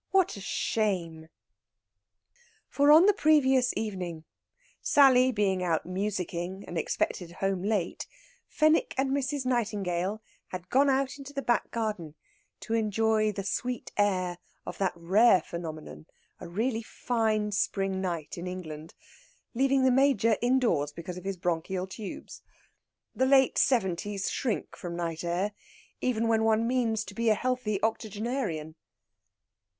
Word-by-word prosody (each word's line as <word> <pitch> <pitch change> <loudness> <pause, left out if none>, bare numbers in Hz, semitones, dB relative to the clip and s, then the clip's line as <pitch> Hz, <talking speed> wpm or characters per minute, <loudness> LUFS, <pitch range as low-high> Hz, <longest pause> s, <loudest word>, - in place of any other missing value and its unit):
What 380 -2 +2
a 200 - -8
shame!" 180 -7 -2 1.4
For 285 +1 +4
on 320 +4 +8
the 415 - +6
previous 265 -7 +3
evening, 180 -7 -4 0.6
Sally 260 -2 +5
being 200 -5 0
out 170 -3 0
musicking 185 -1 -3
and 175 - -7
expected 170 +1 -2
home 195 0 -1
late, 200 -3 -2 0.4
Fenwick 310 +1 +2
and 265 0 +1
Mrs. 280 0 -1
Nightingale 210 -4 -1 0.2
had 180 -1 -8
gone 275 +2 +4
out 270 +1 0
in 275 - -9
the 275 - -2
back 240 - +1
garden 210 -9 -3 0.5
to 225 - -4
enjoy 220 0 +2
the 200 -1 -5
sweet 245 +4 -3
air 185 -4 0 0.3
of - - -7
that 195 -2 +1
rare 190 +5 +4
phenomenon 160 -2 -8 0.3
a - - -8
really 225 +6 -1
fine 220 -2 -1
spring 195 -1 -1
night 170 -3 -4
in 175 - -5
England 160 -4 -7 0.6
leaving 270 +2 +2
the 260 - +5
Major 260 -4 +3
indoors 240 - +2
because 170 +3 -7
of 180 - -15
his 195 -1 -3
bronchial 175 +2 -2
tubes. 195 +2 -8 0.7
The 260 - +1
late 265 -1 +4
seventies 200 -4 0
shrink 240 -5 -2
from 175 -3 -6
night 165 -1 -3
air, 175 +4 -1 0.5
even 230 -2 0
when 225 -1 +2
one 225 0 +2
means 235 -4 0
to 205 - -10
be 230 +2 +1
a 215 - +4
healthy 250 -4 -1
octogenarian. 215 - -2
210 Hz, 135 wpm, -28 LUFS, 180-250 Hz, 1.4 s, on